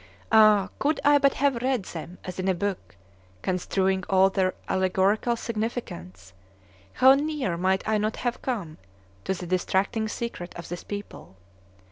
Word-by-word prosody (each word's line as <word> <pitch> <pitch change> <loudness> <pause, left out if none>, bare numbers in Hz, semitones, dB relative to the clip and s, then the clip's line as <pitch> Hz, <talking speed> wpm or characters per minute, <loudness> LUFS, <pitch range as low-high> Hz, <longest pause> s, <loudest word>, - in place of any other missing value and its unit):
Ah! 215 -3 +6
could 295 +1 +1
I 290 0 +6
but 275 -1 +3
have 275 -4 +1
read 255 -4 0
them 175 +1 -8
as 185 0 -7
in 185 - -1
a 190 - +2
book, 200 - -4 0.5
construing 190 +1 0
all 190 0 +4
their 185 -1 0
allegorical 190 +5 +1
significance, 95 - -5 0.6
how 260 +1 +7
near 285 - -1
might 190 +3 0
I 215 -1 +2
not 215 +1 -1
have 245 -1 -3
come 200 -12 -4 0.5
to 190 - 0
the 180 - -7
distracting 190 +5 0
secret 215 -6 -5
of 170 - -8
this 175 0 -6
people! 205 - -8
195 Hz, 150 wpm, -26 LUFS, 185-235 Hz, 0.6 s, how